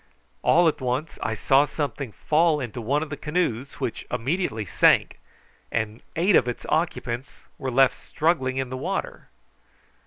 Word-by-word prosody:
All 175 +1 +5
at 155 - 0
once 130 +5 -2
I 110 - -1
saw 135 +6 +4
something 145 -4 -3
fall 155 +5 +2
into 120 -2 -5
one 140 +7 0
of 155 - -8
the - - -2
canoes, 145 -5 -2
which 115 - -4
immediately 125 - -1
sank, - - +3 0.5
and 110 0 -2
eight 180 +4 +3
of 125 - +4
its 120 - -4
occupants 140 -6 -2 0.2
were 135 - -2
left 130 +1 +3
struggling 140 -5 0
in 130 -1 -2
the 130 - -3
water. - - -4
135 Hz, 155 wpm, -25 LUFS, 120-155 Hz, 0.5 s, All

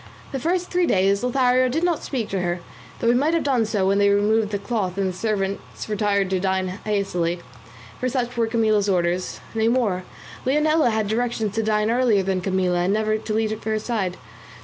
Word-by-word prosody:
The 270 - -3
first 355 +5 -1
three 355 -1 +2
days 195 +1 +2
Lothario 255 0 +3
did 320 +7 -1
not 350 -2 +1
speak 240 -6 -3
to 195 -2 -1
her, 175 0 -2 0.4
though - - -2
he - - +5
might 295 +7 +2
have 335 - +1
done 255 -6 +1
so 210 -3 0
when 195 +1 +2
they 200 0 +4
removed 210 +1 +2
the 205 - -1
cloth 200 -4 -2
and 195 -1 +1
the 185 - -6
servants 195 -1 -3
retired 205 -2 +1
to 190 - +1
dine 190 0 0 0.2
hastily; 180 -5 -1 0.6
for 255 - 0
such 245 -1 -2
were 230 -1 +1
Camilla's 215 -3 +2
orders; 180 -1 0
nay 225 0 +1
more, 225 -7 +1 0.4
Leonela 300 +1 +3
had 220 -2 0
directions 225 -1 -1
to 225 - 0
dine 215 0 +1
earlier 235 -5 +3
than 190 -1 -1
Camilla 185 -1 0
and 180 +3 +1
never 215 0 +1
to 215 - -4
leave 220 0 -1
her 220 0 0
side. 210 -5 -2
215 Hz, 200 wpm, -23 LUFS, 195-245 Hz, 0.6 s, he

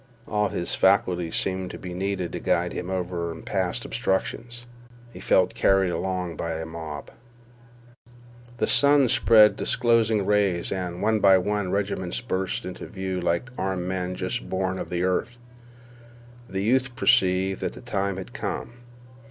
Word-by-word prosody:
All 105 -1 +1
his 85 -2 -2
faculties 90 -2 +2
seemed 95 -1 -1
to - - -7
be 90 -1 -7
needed 95 -1 -2
to - - -4
guide - - 0
him 90 - -5
over 90 -2 -2
and 80 - -10
past 95 +4 -1
obstructions. 120 +2 -2 0.5
He - - -10
felt - - +2
carried 95 -2 +3
along 90 -2 -3
by 85 -1 -3
a 80 0 -4
mob. 80 -2 -7 1.5
The - - +1
sun 140 +1 +4
spread 110 -2 +6
disclosing 115 -4 +2
rays, 100 -4 +1
and, 90 -1 -3
one 110 0 +2
by 95 -2 +6
one, 105 +1 -1
regiments 95 -2 -1
burst 120 0 -2
into 90 - -7
view 95 -2 -4
like 85 +8 -1
armed 95 -1 -2
men 90 -1 -2
just - - -3
born 95 0 -1
of - - -5
the 90 0 -1
earth. 110 +7 -1 1.1
The 95 0 -2
youth 130 +3 +1
perceived 95 -5 +2
that - - -2
the - - -11
time 100 -1 -2
had 95 - -8
come. 120 - -4
95 Hz, 155 wpm, -25 LUFS, 90-105 Hz, 1.5 s, spread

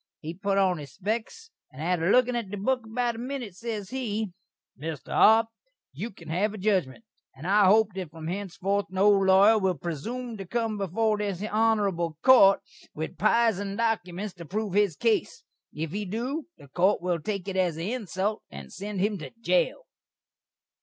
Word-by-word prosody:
He 160 +1 -6
put 195 +2 -1
on 185 -4 +2
his 140 -3 -10
speks, 225 - -4 0.2
and 130 - -13
atter 170 +1 0
lookin' 250 -1 +4
at 230 -5 -3
the 205 - -5
book 245 +3 -1
about 240 +1 -1
a - - -7
minit, 250 -5 -5
ses 210 0 -5
he: 220 -6 -2 0.4
"Mr. 150 -1 -7
Arp, 220 +1 +6 0.5
you 230 - -5
can 170 -6 -15
have 200 +6 0
a - - -7
judgment, 190 -6 0 0.3
and 135 +5 -11
I 200 +2 +4
hope 215 +2 +5
that 185 -4 -5
from 160 0 -10
hensefourth 195 +2 -2
no 190 +2 +2
lawyer 195 +2 +5
will 190 -3 0
presoom 225 - -5
to 195 - -7
cum 225 0 -2
before 210 +3 0
this 200 -3 -2
honerabul 205 -6 +1
court 220 -7 +7 0.3
with 160 +1 -5
pisen 205 -3 +2
dokyments 205 -4 -1
to 170 - -9
proove 205 +3 -3
his 205 -5 +2
case. 240 - 0 0.3
If 155 0 -4
he 205 +3 -3
do, 250 - -3
this 140 - -16
court 190 +4 +3
will 175 -2 0
take 195 +3 -4
it 195 - -3
as 180 -4 +1
an 165 - -4
insult, 210 -2 -2
and 70 -1 -10
send 200 -1 -4
him 205 -1 0
to 145 -4 -7
jail." - - +1
200 Hz, 180 wpm, -27 LUFS, 180-225 Hz, 0.5 s, court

